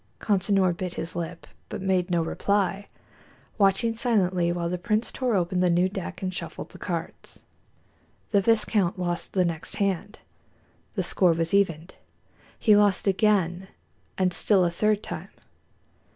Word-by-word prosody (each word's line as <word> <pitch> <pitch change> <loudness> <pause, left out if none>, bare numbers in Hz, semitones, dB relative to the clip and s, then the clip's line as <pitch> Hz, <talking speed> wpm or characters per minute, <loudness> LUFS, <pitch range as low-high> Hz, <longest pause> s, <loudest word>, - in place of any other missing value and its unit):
Consinor 195 -3 +2
bit 180 0 -5
his 165 - -5
lip, 170 0 -5 0.2
but - - -5
made 190 -1 0
no 170 -2 +1
reply, 200 +3 -1 0.7
watching 205 +4 +3
silently 185 -7 +1
while 175 -1 -2
the 180 +1 -3
prince 215 +4 0
tore 250 -4 -1
open 180 0 0
the 180 0 +3
new 175 +2 +3
deck 190 0 -6
and 185 0 -2
shuffled - - -6
the - - -13
cards. - - -6 0.9
The 200 - +4
viscount 210 -4 +2
lost 175 -1 -3
the 185 -2 +2
next 165 -2 -3
hand, 200 +1 -1
and - - -35
the 190 - 0
score 175 0 +3
was 165 +1 -2
evened. 175 -4 +1 0.6
He 215 -3 +5
lost 205 -2 +3
again, 190 -3 +1 0.5
and 185 -1 +1
still 190 -2 +3
a 170 - 0
third 210 +4 +1
time. - - -6
185 Hz, 150 wpm, -26 LUFS, 175-205 Hz, 0.9 s, He